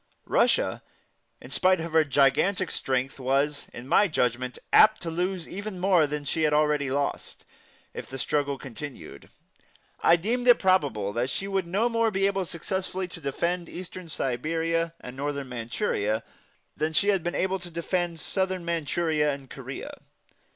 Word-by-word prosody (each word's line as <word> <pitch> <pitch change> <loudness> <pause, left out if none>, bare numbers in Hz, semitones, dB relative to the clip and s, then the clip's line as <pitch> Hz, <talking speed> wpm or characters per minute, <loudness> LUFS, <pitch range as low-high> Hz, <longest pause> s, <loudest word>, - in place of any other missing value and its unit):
Russia, - - +2 0.6
in - - -12
spite 185 -1 +3
of 165 0 -5
her 160 -1 +6
gigantic 145 +7 +2
strength, 130 +1 -1
was, 140 +3 0
in 120 +1 -9
my 205 - +5
judgment, 125 -5 -1 0.2
apt 215 0 +7
to 165 - -4
lose 180 +1 -2
even 200 0 -6
more 180 -4 +4
than 145 0 -4
she 160 +3 -1
had 155 -1 +3
already 150 -2 +2
lost 140 +1 -3 0.5
if - - -7
the 135 - -7
struggle 140 +1 0
continued. 135 +2 -9 0.7
I 165 - +6
deemed 235 +8 -1
it 245 - +8
probable 145 - +1
that 120 +3 0
she 195 +9 -2
would 195 -3 -1
no 200 +7 +1
more 230 -1 +2
be 195 -2 +1
able 195 -1 +1
successfully 185 +2 -3
to 175 - -10
defend 170 +5 -2
Eastern 180 -1 -8
Siberia 165 +5 -1
and 125 0 -9
Northern 140 -1 -3
Manchuria 115 - -1 0.5
than 155 +1 -1
she 200 +6 +3
had 195 -3 +3
been 175 +1 -3
able 190 0 0
to 175 0 -8
defend 170 0 -2
Southern 185 +1 -1
Manchuria 160 -2 0
and 140 -2 -8
Korea. - - -7
165 Hz, 160 wpm, -27 LUFS, 140-185 Hz, 0.7 s, it